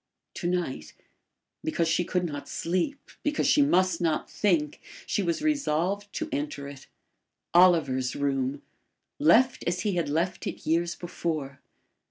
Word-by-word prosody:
To 175 Hz, -, -2 dB
night 165 Hz, -, -2 dB, 0.7 s
because 165 Hz, +1 st, 0 dB
she 165 Hz, +2 st, +2 dB
could 180 Hz, 0 st, -1 dB
not 145 Hz, -3 st, -6 dB
sleep; 185 Hz, +12 st, -2 dB
because 295 Hz, 0 st, 0 dB
she 300 Hz, -, +5 dB
must 185 Hz, -, +3 dB
not 160 Hz, -3 st, 0 dB
think 165 Hz, -8 st, +1 dB, 0.2 s
she -, -, 0 dB
was 170 Hz, -, -1 dB
resolved 205 Hz, -, 0 dB
to 320 Hz, -, -3 dB
enter 285 Hz, -, -3 dB
it. 140 Hz, -1 st, -11 dB, 0.7 s
Oliver's 160 Hz, -8 st, +4 dB
room! 140 Hz, -1 st, -1 dB, 0.6 s
left 260 Hz, -3 st, +4 dB
as 180 Hz, +1 st, 0 dB
he 205 Hz, -2 st, 0 dB
had 165 Hz, -4 st, 0 dB
left 170 Hz, +4 st, -1 dB
it -, -, -6 dB
years 170 Hz, +2 st, +1 dB
before! 155 Hz, -5 st, -4 dB
170 Hz, 140 wpm, -27 LUFS, 150-195 Hz, 0.7 s, she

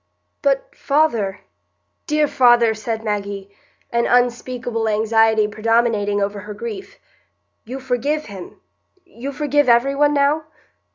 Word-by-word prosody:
"But, -, -, 0 dB
father, 235 Hz, -10 st, 0 dB, 0.7 s
dear 300 Hz, -1 st, +2 dB
father," 240 Hz, -4 st, +4 dB
said 220 Hz, +1 st, -4 dB
Maggie, 200 Hz, -2 st, -4 dB, 0.4 s
an 235 Hz, 0 st, +1 dB
unspeakable 245 Hz, -2 st, 0 dB
anxiety 220 Hz, 0 st, +3 dB
predominating 215 Hz, -1 st, +1 dB
over 200 Hz, 0 st, -2 dB
her 210 Hz, +1 st, -8 dB
grief, 430 Hz, -4 st, -7 dB, 0.7 s
"you 255 Hz, +4 st, -6 dB
forgive 265 Hz, +4 st, -1 dB
him—you 235 Hz, -, -11 dB
forgive 290 Hz, -1 st, +1 dB
every 240 Hz, +4 st, +4 dB
one 295 Hz, +1 st, +2 dB
now?" 290 Hz, +2 st, +2 dB
235 Hz, 110 wpm, -20 LUFS, 215-285 Hz, 0.7 s, father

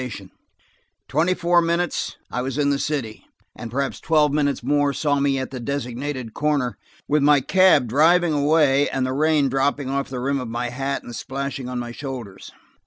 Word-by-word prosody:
In -, -, -15 dB, 0.8 s
twenty 160 Hz, -, +1 dB
four 175 Hz, 0 st, +3 dB
minutes 170 Hz, +1 st, -1 dB, 0.2 s
I 125 Hz, -, -2 dB
was 130 Hz, +1 st, -4 dB
in 145 Hz, -1 st, +2 dB
the 140 Hz, -, 0 dB
city, 135 Hz, -9 st, -3 dB, 0.3 s
and 115 Hz, -, -7 dB
perhaps 135 Hz, +3 st, -2 dB
twelve 150 Hz, -3 st, +2 dB
minutes 145 Hz, -4 st, 0 dB
more 145 Hz, +1 st, +1 dB
saw 145 Hz, +1 st, 0 dB
me 140 Hz, -1 st, +1 dB
at 130 Hz, -, -4 dB
the 130 Hz, -, -6 dB
designated 130 Hz, -1 st, -4 dB
corner, 145 Hz, -5 st, 0 dB, 0.3 s
with 150 Hz, 0 st, +2 dB
my 145 Hz, 0 st, +5 dB
cab 175 Hz, -3 st, +4 dB
driving 160 Hz, +7 st, +3 dB
away 145 Hz, -1 st, +3 dB
and 130 Hz, -1 st, -1 dB
the 130 Hz, -, -2 dB
rain 150 Hz, 0 st, +2 dB
dropping 135 Hz, +1 st, 0 dB
off 140 Hz, 0 st, -2 dB
the 130 Hz, -1 st, -5 dB
rim 140 Hz, +2 st, -1 dB
of 125 Hz, -, -5 dB
my 120 Hz, +2 st, -3 dB
hat 135 Hz, +3 st, -3 dB
and 120 Hz, -, -9 dB
splashing 135 Hz, +2 st, -5 dB
on 125 Hz, -, -4 dB
my 120 Hz, -1 st, -4 dB
shoulders. 120 Hz, -7 st, -8 dB
140 Hz, 185 wpm, -22 LUFS, 130-150 Hz, 0.8 s, my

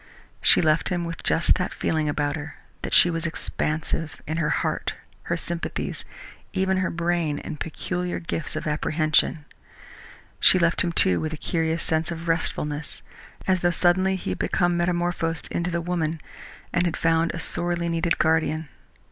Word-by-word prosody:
She -, -, +5 dB
left 155 Hz, 0 st, +2 dB
him 175 Hz, -2 st, -1 dB
with 170 Hz, 0 st, -5 dB
just 165 Hz, -, +3 dB
that 185 Hz, -, -2 dB
feeling 155 Hz, -2 st, 0 dB
about 145 Hz, -1 st, 0 dB
her 155 Hz, 0 st, -7 dB, 0.3 s
that -, -, -4 dB
she 175 Hz, -, +6 dB
was 165 Hz, 0 st, -1 dB
expansive, 160 Hz, 0 st, -3 dB
in 155 Hz, +2 st, -3 dB
her 165 Hz, -3 st, +1 dB
heart, -, -, -1 dB, 0.3 s
her 170 Hz, -, -1 dB
sympathies, 170 Hz, 0 st, -4 dB, 0.5 s
even 190 Hz, 0 st, +1 dB
her 185 Hz, 0 st, +1 dB
brain 170 Hz, -3 st, 0 dB
and 150 Hz, -, -6 dB
peculiar 180 Hz, +2 st, -3 dB
gifts 165 Hz, -1 st, -4 dB
of 155 Hz, -, -3 dB
apprehension. 155 Hz, 0 st, +1 dB, 0.9 s
She -, -, +6 dB
left 170 Hz, -1 st, +2 dB
him, 175 Hz, -, 0 dB
too, 90 Hz, -, +5 dB
with 155 Hz, 0 st, -3 dB
a -, -, -5 dB
curious 160 Hz, +1 st, -1 dB
sense 160 Hz, 0 st, 0 dB
of 170 Hz, 0 st, -5 dB
restfulness, 150 Hz, -2 st, -2 dB, 0.4 s
as 190 Hz, -1 st, +2 dB
though 175 Hz, -, +2 dB
suddenly 185 Hz, +2 st, +3 dB
he 175 Hz, -, -4 dB
had 90 Hz, -, -4 dB
become 175 Hz, -1 st, +1 dB
metamorphosed 175 Hz, -1 st, -1 dB
into 170 Hz, +1 st, -1 dB
the 170 Hz, -1 st, -1 dB
woman 165 Hz, -2 st, -1 dB, 0.5 s
and 175 Hz, +1 st, +2 dB
had 165 Hz, -, -2 dB
found 165 Hz, 0 st, +2 dB
a -, -, -4 dB
sorely 175 Hz, +1 st, +1 dB
needed 165 Hz, 0 st, +1 dB
guardian. 160 Hz, -1 st, +1 dB
165 Hz, 165 wpm, -25 LUFS, 160-175 Hz, 0.9 s, she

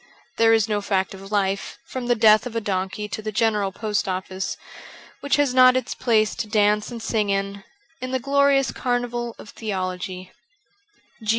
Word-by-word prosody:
There 225 Hz, 0 st, +5 dB
is 225 Hz, -1 st, +3 dB
no 210 Hz, -1 st, 0 dB
fact 195 Hz, -2 st, -1 dB
of 195 Hz, +1 st, -11 dB
life, 195 Hz, -1 st, -1 dB
from 255 Hz, -2 st, -5 dB
the 240 Hz, -, +3 dB
death 215 Hz, +1 st, +5 dB
of 235 Hz, -, -9 dB
a -, -, +2 dB
donkey 200 Hz, 0 st, -3 dB
to 215 Hz, -, -4 dB
the 215 Hz, 0 st, -4 dB
General 210 Hz, -2 st, +1 dB
Post 210 Hz, +1 st, -2 dB
Office, 190 Hz, 0 st, -3 dB, 0.6 s
which 285 Hz, -, +1 dB
has 285 Hz, -3 st, +2 dB
not 255 Hz, 0 st, +7 dB
its 255 Hz, -, -3 dB
place 220 Hz, -4 st, +2 dB
to 220 Hz, -, -3 dB
dance 210 Hz, -1 st, +2 dB
and 235 Hz, -, -6 dB
sing 215 Hz, -3 st, 0 dB
in, 200 Hz, 0 st, -2 dB, 0.4 s
in 255 Hz, -, -4 dB
the 260 Hz, -, 0 dB
glorious 275 Hz, 0 st, +2 dB
carnival 240 Hz, -1 st, -2 dB
of -, -, -12 dB
theology. 185 Hz, -3 st, -4 dB
215 Hz, 175 wpm, -23 LUFS, 195-240 Hz, 0.6 s, not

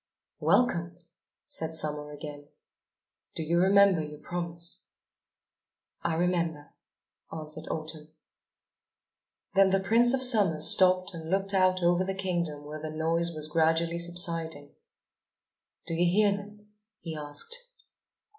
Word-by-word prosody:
"Welcome," 175 Hz, -8 st, +1 dB, 0.5 s
said 160 Hz, 0 st, -4 dB
Summer 150 Hz, -1 st, -2 dB
again. 145 Hz, -1 st, -10 dB, 0.9 s
"Do 160 Hz, -, -3 dB
you 170 Hz, +2 st, 0 dB
remember 195 Hz, -1 st, +4 dB
your 150 Hz, -1 st, -8 dB
promise?" 170 Hz, +1 st, -4 dB, 1.1 s
"I 170 Hz, -1 st, -2 dB
remember," 170 Hz, -3 st, -2 dB, 0.6 s
answered 155 Hz, -1 st, -7 dB
Autumn. 155 Hz, -1 st, -5 dB, 1.4 s
Then 195 Hz, 0 st, +4 dB
the 195 Hz, +1 st, +2 dB
Prince 235 Hz, +6 st, +3 dB
of 260 Hz, -, +1 dB
Summer 205 Hz, -11 st, +7 dB
stopped 185 Hz, +3 st, +3 dB
and 165 Hz, -1 st, -8 dB
looked 195 Hz, +2 st, -1 dB
out 185 Hz, -1 st, +2 dB
over 175 Hz, +1 st, +2 dB
the 190 Hz, 0 st, -4 dB
kingdom 170 Hz, -6 st, -3 dB
where 150 Hz, +1 st, -8 dB
the 155 Hz, -, -5 dB
noise 165 Hz, +2 st, -1 dB
was 155 Hz, -2 st, -4 dB
gradually 165 Hz, +2 st, 0 dB
subsiding. 165 Hz, -4 st, +1 dB, 1.1 s
"Do -, -, -5 dB
you 175 Hz, +1 st, +1 dB
hear 205 Hz, +2 st, +3 dB
them?" 210 Hz, +1 st, -12 dB, 0.3 s
he 165 Hz, -2 st, -7 dB
asked. 460 Hz, -, -4 dB
170 Hz, 120 wpm, -28 LUFS, 155-190 Hz, 1.4 s, Summer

